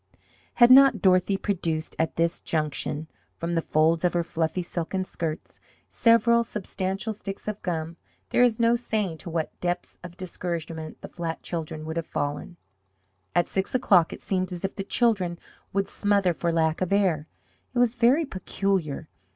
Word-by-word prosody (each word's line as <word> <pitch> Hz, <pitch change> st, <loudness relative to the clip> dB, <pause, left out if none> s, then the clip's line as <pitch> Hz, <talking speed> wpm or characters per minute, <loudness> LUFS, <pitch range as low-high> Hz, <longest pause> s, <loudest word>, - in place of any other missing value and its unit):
Had 240 Hz, 0 st, +7 dB
not 270 Hz, -4 st, +8 dB
Dorothy 185 Hz, +1 st, +3 dB
produced, 165 Hz, -6 st, -2 dB
at 160 Hz, -, 0 dB
this 170 Hz, 0 st, 0 dB
junction, 155 Hz, 0 st, -2 dB, 0.3 s
from 170 Hz, +1 st, -3 dB
the 165 Hz, -, +1 dB
folds 160 Hz, +2 st, +2 dB
of 180 Hz, -, +2 dB
her 175 Hz, -1 st, +1 dB
fluffy 165 Hz, +2 st, -1 dB
silken 175 Hz, +2 st, -3 dB
skirts 165 Hz, -4 st, -5 dB, 0.3 s
several 235 Hz, 0 st, +4 dB
substantial 195 Hz, 0 st, -3 dB
sticks 195 Hz, -1 st, -8 dB
of 210 Hz, -1 st, -3 dB
gum, 165 Hz, -1 st, -3 dB, 0.3 s
there -, -, +3 dB
is 240 Hz, -2 st, +4 dB
no 230 Hz, 0 st, +4 dB
saying 210 Hz, -8 st, -2 dB
to 180 Hz, -, -7 dB
what 160 Hz, -1 st, -3 dB
depths 175 Hz, 0 st, -3 dB
of 175 Hz, 0 st, -10 dB
discouragement 170 Hz, -3 st, -5 dB
the -, -, -7 dB
flat 165 Hz, -2 st, -5 dB
children 155 Hz, -2 st, -4 dB
would 160 Hz, +1 st, -4 dB
have 165 Hz, -, -2 dB
fallen! 145 Hz, +4 st, -3 dB, 0.8 s
About 175 Hz, -, +4 dB
six 190 Hz, +5 st, -2 dB
o'clock 195 Hz, -10 st, +4 dB
it -, -, -8 dB
seemed 185 Hz, -1 st, -1 dB
as 180 Hz, +1 st, -4 dB
if 195 Hz, -, -4 dB
the 195 Hz, -, -3 dB
children 195 Hz, -6 st, +1 dB, 0.3 s
would 195 Hz, 0 st, 0 dB
smother 200 Hz, -3 st, +1 dB
for 170 Hz, +1 st, -1 dB
lack 160 Hz, 0 st, +1 dB
of 185 Hz, -, -1 dB
air! 180 Hz, -7 st, +2 dB, 0.4 s
It 250 Hz, -, -6 dB
was 240 Hz, -2 st, +4 dB
very 250 Hz, +6 st, +3 dB
peculiar. 185 Hz, -, -2 dB
180 Hz, 165 wpm, -26 LUFS, 165-205 Hz, 0.8 s, not